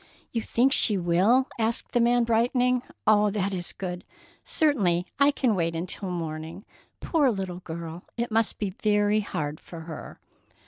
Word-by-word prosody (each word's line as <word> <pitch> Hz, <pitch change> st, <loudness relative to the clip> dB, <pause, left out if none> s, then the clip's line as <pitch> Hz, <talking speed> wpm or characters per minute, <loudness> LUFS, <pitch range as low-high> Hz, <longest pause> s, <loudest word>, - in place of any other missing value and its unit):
"You 230 Hz, -, -1 dB
think 255 Hz, +5 st, +2 dB
she 210 Hz, -7 st, +5 dB
will?" 190 Hz, +10 st, +3 dB
asked 225 Hz, +1 st, 0 dB
the 240 Hz, -, +2 dB
young 235 Hz, -, +4 dB
man, 240 Hz, 0 st, +3 dB
brightening. 245 Hz, +2 st, +2 dB, 0.2 s
"Oh, 210 Hz, -1 st, +4 dB
that 200 Hz, -1 st, -1 dB
is 175 Hz, -2 st, -2 dB
good! 180 Hz, -2 st, -6 dB, 0.4 s
Certainly 195 Hz, -, +2 dB
I 280 Hz, 0 st, +6 dB
can 260 Hz, -5 st, +1 dB
wait 170 Hz, -3 st, -1 dB
until 185 Hz, +3 st, -3 dB
morning. 165 Hz, +2 st, -5 dB, 0.4 s
Poor 300 Hz, -5 st, +2 dB
little 190 Hz, -5 st, -3 dB
girl, 165 Hz, 0 st, -7 dB
it 235 Hz, 0 st, -2 dB
must 225 Hz, 0 st, +1 dB
be 205 Hz, -3 st, -2 dB
very 205 Hz, +1 st, +1 dB
hard 155 Hz, -7 st, -4 dB
for 165 Hz, -2 st, -10 dB
her!" 160 Hz, -2 st, -9 dB
205 Hz, 165 wpm, -26 LUFS, 175-235 Hz, 0.4 s, I